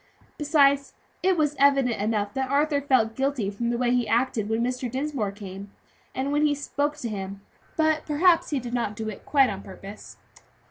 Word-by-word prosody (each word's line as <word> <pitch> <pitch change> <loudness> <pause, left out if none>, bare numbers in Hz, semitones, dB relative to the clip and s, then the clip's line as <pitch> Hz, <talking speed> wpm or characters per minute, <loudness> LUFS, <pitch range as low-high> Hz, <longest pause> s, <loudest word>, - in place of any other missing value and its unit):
Besides 280 -2 +3 0.3
it 375 -1 +2
was 295 -2 +1
evident 270 -6 +3
enough 205 -1 -1
that 265 -1 -2
Arthur 285 +1 +2
felt 255 -6 +2
guilty 265 -6 -1
from 235 +4 -2
the 240 - 0
way 245 0 +1
he 245 -2 +1
acted 230 -2 0
when 225 +1 0
Mr. 250 0 -2
Dinsmore 260 -5 -2
came, 200 -1 -9 0.5
and 270 +2 -1
when 295 +1 +2
he 295 -1 +3
spoke 290 +1 -2
to 240 - -4
him. 195 -2 -5 0.4
But 315 -1 +1
perhaps 330 +3 +3
he 290 - 0
did 240 -1 -7
not 235 -4 -1
do 220 0 -4
it 210 - -10
quite 270 -5 +4
on 195 -1 -6
purpose." 195 +2 -11
255 Hz, 190 wpm, -25 LUFS, 220-285 Hz, 0.5 s, quite